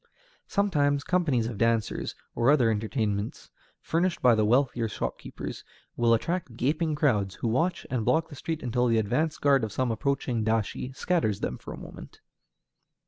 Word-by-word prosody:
Sometimes 145 -8 +1
companies 165 -10 +1
of 115 -3 -5
dancers, 115 -2 0 0.2
or 120 +2 +2
other 130 -6 +5
entertainments 105 -1 -2 0.3
furnished 170 +2 0
by 125 -2 +5
the 110 -1 +2
wealthier 120 +1 +2
shopkeepers, 60 - -5 0.3
will 115 -1 +4
attract 160 -2 -3
gaping 155 +5 0
crowds, 105 - +1
who - - -3
watch 165 +10 0
and 125 -4 0
block 160 +7 +2
the 145 - -9
street 160 +3 -4
until 125 0 +1
the 115 -1 +3
advance 150 +9 0
guard 140 -3 +3
of 110 - -2
some 130 +2 0
approaching 125 -1 -1
dashi 110 +3 -1
scatters 140 - 0
them 65 - -3
for - - -9
a - - -7
moment. - - -11
125 Hz, 160 wpm, -27 LUFS, 110-150 Hz, 0.3 s, other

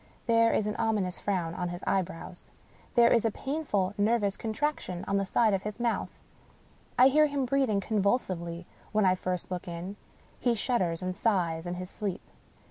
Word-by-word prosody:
There 230 -1 +4
is 210 - +1
an 210 - -2
ominous 215 -5 0
frown 180 -5 -1
on 180 0 -3
his 175 +1 -7
eyebrows 180 -1 -3 0.2
— - - -28
^there 235 0 +7
is 230 - +4
a 225 - +3
painful 220 -7 -1
nervous 205 -1 +2
contraction 220 - -2
on 200 - +1
the 195 -1 0
side 220 0 +3
of 195 - +1
his 210 +2 -6
mouth. 235 -1 0 0.9
I 255 - +8
hear 300 +3 +5
him 280 -2 -1
breathing 250 -6 +1
convulsively 185 -5 -1 0.3
when 215 -1 +3
I 185 - +5
first 185 0 -3
look 180 -1 -4
in; 175 +4 -6 0.4
he 240 -2 +2
shudders 190 -7 0
and 185 0 -2
sighs 175 -7 0
in 175 - -3
his 180 +1 -7
sleep. 200 -2 -4
200 Hz, 180 wpm, -29 LUFS, 180-230 Hz, 0.9 s, I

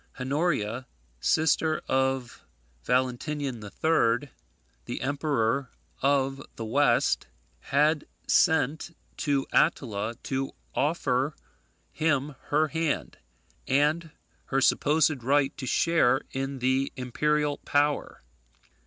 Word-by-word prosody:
Honoria, 130 -4 -1 0.3
sister 155 - +2
of 130 -2 -1 0.4
Valentinian 130 0 -1
III., 130 +2 +1 0.6
the - - -4
Emperor 140 -2 0 0.3
of 135 0 +1
the 115 - -5
West, 120 +1 +2 0.3
had 150 - +1 0.2
sent 160 +2 +2 0.2
to 140 -4 0
Attila 115 -8 +1
to 135 0 -2 0.2
offer 145 -2 0 0.6
him 150 -2 0
her 155 +1 +2
hand, 160 0 -2 0.5
and 150 +5 +2 0.4
her 135 - 0
supposed 145 0 +2
right 140 +2 +2
to 130 - -6
share 135 -3 +3
in 135 +1 -3
the 130 +2 +1
imperial 145 +3 0
power. 145 - 0
140 Hz, 90 wpm, -27 LUFS, 130-150 Hz, 0.6 s, share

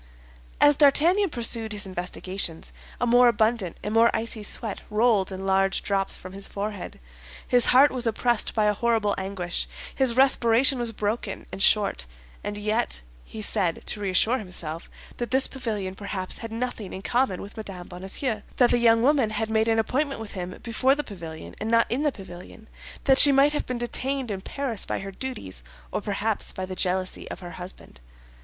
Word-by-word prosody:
As 290 -1 +5
D'Artagnan 335 +7 +4
pursued 230 -4 0
his 205 -1 -3
investigations, 185 -2 -4 0.3
a - - +1
more 245 +1 +5
abundant 220 -5 +1
and 210 - -3
more 230 +1 +5
icy 225 0 -2
sweat 210 0 -3
rolled 210 -3 +2
in 190 0 -6
large 195 0 +2
drops 195 -1 +1
from 185 0 -10
his 195 0 -1
forehead; 205 -1 -6 0.5
his 245 -1 +4
heart 270 +3 +6
was 250 -2 +1
oppressed 235 0 0
by 215 -2 +2
a 210 - +3
horrible 220 -1 +1
anguish; 190 -2 -3 0.3
his 260 -4 +2
respiration 260 0 +4
was 235 -1 +1
broken 210 -1 -3
and 195 - -6
short. 200 - +2 0.4
And 205 0 -4
yet 210 - -1 0.2
he 215 - -6
said, 175 -4 -1
to - - -1
reassure 205 +6 +2
himself, 170 -5 -6 0.3
that 240 - -3
this 265 +1 +4
pavilion 215 -8 -4
perhaps 190 -1 -3
had 230 -1 -7
nothing 230 -3 -4
in 190 - -7
common 245 -6 0
with 200 - -9
Mme. 195 -5 -6
Bonacieux; 195 +5 -3 0.2
that 245 -2 +4
the 240 - +3
young 230 -1 +4
woman 270 -4 +3
had 220 +1 -3
made 220 0 +2
an 225 0 +2
appointment 275 +4 -1
with 220 -2 -7
him 180 -1 -6
before 255 +3 +2
the 295 - -3
pavilion, 165 - -9
and 215 - -3
not 230 0 +4
in 250 +4 0
the 300 -1 +1
pavilion; 195 +1 -12 0.4
that 270 -1 +5
she 285 - +9
might 280 +2 +4
have 295 - -3
been 250 - -3
detained 255 +1 -2
in 195 -1 -4
Paris 250 -2 -2
by - - +1
her 195 0 -6
duties, 195 - -7 0.3
or - - -2
perhaps 210 +1 0
by 185 - -5
the 185 0 -7
jealousy 185 0 -2
of - - -7
her 175 -1 -8
husband. 180 - -8
220 Hz, 185 wpm, -25 LUFS, 195-245 Hz, 0.5 s, she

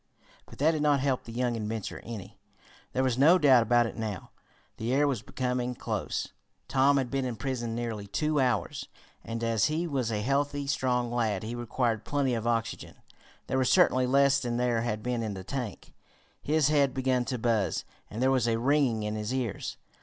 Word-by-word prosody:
But - - -13
that 155 +4 +4
did 155 -2 -2
not 145 -2 +3
help 130 -1 0
the 115 - -8
young 120 0 -1
inventor 110 -1 -4
any. 110 -6 -9 0.5
There 130 - 0
was 130 -1 0
no 165 +6 +7
doubt 135 -7 +6
about 120 +1 +3
it 115 - -5
now 110 -5 -5 0.5
the 115 +2 -2
air 145 +1 +3
was 130 -7 -1
becoming 125 0 -2
close. - - -3 0.4
Tom 140 +1 +4
had 130 -3 -1
been 135 -1 0
imprisoned 120 -1 -3
nearly 115 -4 -4
two 150 +9 0
hours, 125 -5 0 0.4
and 115 0 -5
as 115 -2 +2
he 155 +3 0
was 135 -8 -1
a 105 -1 -1
healthy, 140 +2 0
strong 125 -3 0
lad, 110 -5 0
he 110 +2 -4
required 120 -2 -1
plenty 140 -3 0
of 115 0 -2
oxygen. 115 -2 -2 0.5
There 130 - 0
was 130 - +2
certainly 130 0 +4
less 140 +1 +4
than 120 -3 -2
there 120 -2 +1
had 110 -2 -2
been 125 -1 -1
in 110 -3 -3
the 95 - -7
tank. 120 -3 -5 0.5
His 150 -1 +2
head 140 -3 +2
began 130 -1 +1
to 130 -1 -2
buzz, 110 -4 0 0.2
and 115 +4 -3
there 130 - +4
was 130 -3 +2
a 115 -1 +2
ringing 125 -3 +2
in 105 0 -2
his 105 +1 -3
ears. 125 -6 -3
125 Hz, 195 wpm, -29 LUFS, 115-135 Hz, 0.5 s, no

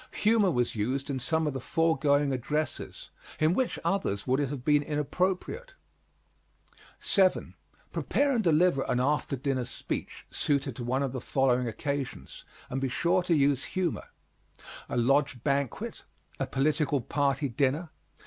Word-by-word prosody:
Humor 215 -3 +5
was 125 -7 0
used 130 +7 -1
in 135 - -2
some 160 +5 0
of 150 - -1
the 135 - -4
foregoing 145 -3 +2
addresses 150 +5 -3 0.3
in 155 +2 +3
which 255 +5 0
others 100 - 0
would 130 +1 +2
it 140 -3 0
have 135 -3 -6
been 150 -1 +4
inappropriate? 185 - -2 1.2
7. 190 -2 +2 0.4
Prepare 285 0 +1
and 235 -4 +1
deliver 170 -3 +3
an 125 - +2
after 145 +2 +1
dinner 135 -1 -1
speech - - -5
suited 140 -2 0
to 125 - -4
one 130 +3 0
of 135 - -2
the 130 -1 -5
following 125 -2 +1
occasions, 140 +3 -4 0.2
and 135 +1 -3
be 135 - 0
sure 170 +7 +2
to 175 -1 +1
use 140 -2 +2
humor: 180 -5 -1 0.8
A - - -2
lodge 130 0 +2
banquet. 140 -3 -2 0.4
A - - -1
political 145 0 +1
party 140 +2 0
dinner. 140 +6 0
140 Hz, 150 wpm, -29 LUFS, 130-160 Hz, 1.2 s, Humor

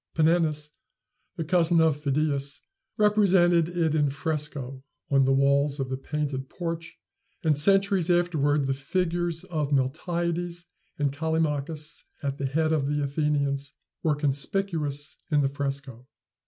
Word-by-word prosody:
Panenus, 155 -2 +1 0.6
the 170 - -3
cousin 170 0 +3
of 160 -2 +4
Phidias, 140 -1 -1 0.4
represented 185 -5 +4
it 170 -3 0
in 150 -2 +2
fresco 140 -3 -4 0.3
on 135 -1 +4
the 135 - +2
walls 140 +1 +2
of 135 -1 -2
the - - 0
painted 140 -1 -4
porch; 165 -1 -5 0.5
and, 155 -2 +3
centuries 195 +3 +4
afterward, 155 -5 +2
the 135 - 0
figures 170 +4 -1
of 150 -4 -3
Miltiades 170 +5 -1 0.3
and 145 -2 0
Callimachus 155 0 -2 0.2
at 140 0 -3
the 140 - -1
head 155 +3 +1
of 145 -3 0
the 145 0 0
Athenians 140 -1 -1 0.3
were 155 -2 +1
conspicuous 150 0 -1
in 150 -2 +3
the 135 - +2
fresco. 135 -3 -5
150 Hz, 130 wpm, -26 LUFS, 140-170 Hz, 0.6 s, of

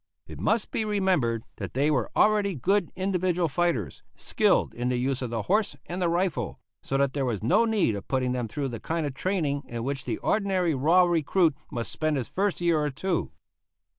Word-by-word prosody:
It - - -10
must 220 -1 +1
be 225 - 0
remembered 185 - +1
that - - -6
they 145 +3 +2
were 125 -7 0
already 205 -3 +3
good 195 +7 +1
individual 185 -2 0
fighters, 160 - -1
skilled - - +1
in 120 +1 -2
the 125 - 0
use 130 +2 -1
of 125 - -3
the 115 -2 -2
horse 210 +2 +1
and 180 +2 -5
the 175 - +2
rifle, 170 - -1 0.2
so 135 - -1
that 140 -1 +1
there 140 - -1
was 115 -6 -2
no 225 - +4
need 215 - +2
of 100 - -7
putting 130 -2 0
them 125 -2 -2
through 140 +4 -3
the 115 -2 -6
kind 165 +6 -2
of 140 - -3
training 150 -3 -1
in 115 -1 -5
which 135 0 -3
the - - -2
ordinary 190 -5 +1
raw 160 +7 +4
recruit 170 -1 +2
must 120 -1 -4
spend 155 -2 0
his 125 -5 -3
first 200 0 0
year 170 -2 +2
or 150 0 0
two. 175 +6 -2
155 Hz, 205 wpm, -27 LUFS, 130-185 Hz, 0.2 s, no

